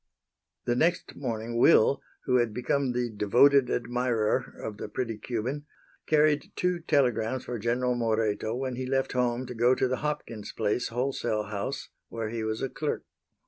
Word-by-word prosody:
The 120 - +1
next 170 +7 +1
morning 115 -3 -3
Will, 125 +2 +5 0.2
who 125 -1 +3
had 120 -3 +1
become 130 +1 0
the 125 0 0
devoted 125 +6 +4
admirer 120 -2 0
of 105 -2 -5
the - - -6
pretty 115 -4 -3
Cuban, 125 +7 -3 0.4
carried 150 -1 +3
two 180 -1 0
telegrams 125 -5 +1
for 120 -2 -4
General 125 +3 +1
Moreto 110 -2 0
when 130 -1 -3
he 130 0 -3
left 135 0 0
home 125 0 0
to 125 - -6
go 120 +2 +4
to 130 - +1
the 130 0 -1
Hopkins 145 -8 -4
place 110 +3 0
wholesale 120 -3 -1
house 105 +6 -4 0.2
where 115 -2 -4
he 115 0 -3
was 110 0 -2
a 135 - -1
clerk. 150 +2 -3
125 Hz, 165 wpm, -28 LUFS, 115-130 Hz, 0.4 s, Will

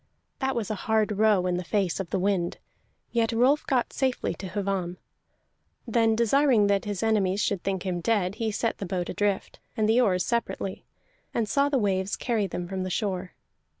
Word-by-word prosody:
That 265 -2 0
was 220 -3 -2
a 215 +1 -6
hard 220 -1 +3
row 210 -4 +4
in 180 -1 0
the 180 - -3
face 195 -1 0
of 190 -3 -4
the - - 0
wind, 185 -2 0 0.5
yet 230 -1 +1
Rolf 255 +6 +3
got 255 -3 +1
safely 260 -2 0
to 190 - -7
Hvamm. 190 -3 -2 0.9
Then, 225 -1 +3
desiring 235 0 +4
that 200 0 +1
his 205 -2 -3
enemies 205 -3 +2
should 200 -3 0
think 190 -1 -2
him 180 -2 -2
dead, 195 -2 +1
he 225 - +1
set 225 +2 -1
the 195 - -4
boat 175 -1 -2
adrift, 205 -2 -1 0.2
and 215 -1 +2
the 230 +3 +4
oars 185 -6 +2
separately, 235 -5 -2 0.5
and 225 -2 +1
saw 280 +5 +2
the 280 - +2
waves 195 -3 0
carry 225 -5 0
them 175 -1 -4
from 190 0 -3
the 185 - -2
shore. 185 -2 -2
205 Hz, 190 wpm, -27 LUFS, 185-230 Hz, 0.9 s, row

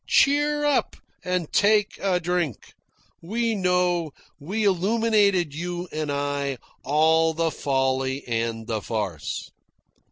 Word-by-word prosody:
Cheer 295 +1 +3
up 290 - +1 0.3
and 180 -3 -2
take 210 0 +3
a 190 -2 +1
drink. 175 - -2 0.5
We 230 +6 -1
know, 180 -5 +1 0.3
we 195 +9 -3
illuminated, 200 -3 +2
you 175 +3 -4
and 155 -1 -3
I, 140 -1 -2 0.3
all 160 +2 +3
the 165 0 0
folly 135 -1 -1
and 115 -1 -2
the 110 -1 -2
farce." 100 -10 -4
170 Hz, 115 wpm, -24 LUFS, 140-200 Hz, 0.5 s, Cheer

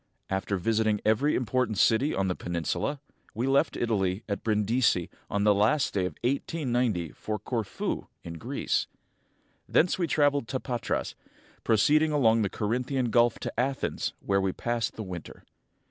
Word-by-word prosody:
After 95 +1 -1
visiting 110 +2 +1
every 120 +8 +3
important 125 -2 0
city 130 +7 +3
on 95 0 0
the 90 - +1
peninsula, 85 - -2 0.4
we 115 +3 -1
left 135 +1 +2
Italy 100 -3 0
at 100 -2 -3
Brindisi 105 -3 +1 0.2
on 100 0 0
the 105 0 +5
last 110 +8 +2
day 95 -3 +1
of 80 - -8
1 120 - +3 0.2
890 120 - -1
for 110 0 -4
Corfu, 110 0 -3 0.2
in 85 -1 -7
Greece. - - -1 0.8
Thence 175 +3 +3
we 175 - +1
traveled 145 -5 +2
to 130 - -2
Patras, 120 -3 -2 0.5
proceeding 150 +8 +3
along 115 -6 +4
the 100 - +1
Corinthian 125 +4 -1
Gulf 120 +1 +4
to - - -2
[xii] 120 - +2
Athens, 135 +1 -2
where 100 0 +1
we 95 -1 +1
passed 120 +3 -2
the 110 - -5
winter. 90 -4 -8
110 Hz, 160 wpm, -28 LUFS, 100-130 Hz, 0.8 s, the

